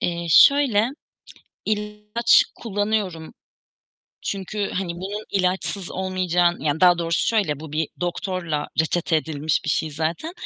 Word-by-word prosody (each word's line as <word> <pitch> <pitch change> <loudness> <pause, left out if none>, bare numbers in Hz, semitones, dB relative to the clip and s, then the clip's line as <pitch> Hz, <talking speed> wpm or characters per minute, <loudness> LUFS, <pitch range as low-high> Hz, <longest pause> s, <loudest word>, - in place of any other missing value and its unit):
Eee, 170 -1 -2
şöyle; 245 - +6 0.8
ilaç 210 +2 +2
kullanıyorum. 205 -6 -2 0.9
Çünkü, 200 +1 -3
hani, 180 -2 -2
bunun 200 +4 -5
ilaçsız 190 0 -1
olmayacağın 180 -2 0
Yani 150 +2 -1
daha 175 -1 +6
doğrusu 170 -1 0
şöyle; 190 -11 0
bu 155 -2 -9
bir 155 0 -1
doktorla 175 -3 -3
reçete 160 0 +1
edilmiş 155 -1 -1
bir 150 - -1
şey 155 +1 0
zaten. 160 - -3
180 Hz, 120 wpm, -23 LUFS, 160-205 Hz, 0.9 s, şöyle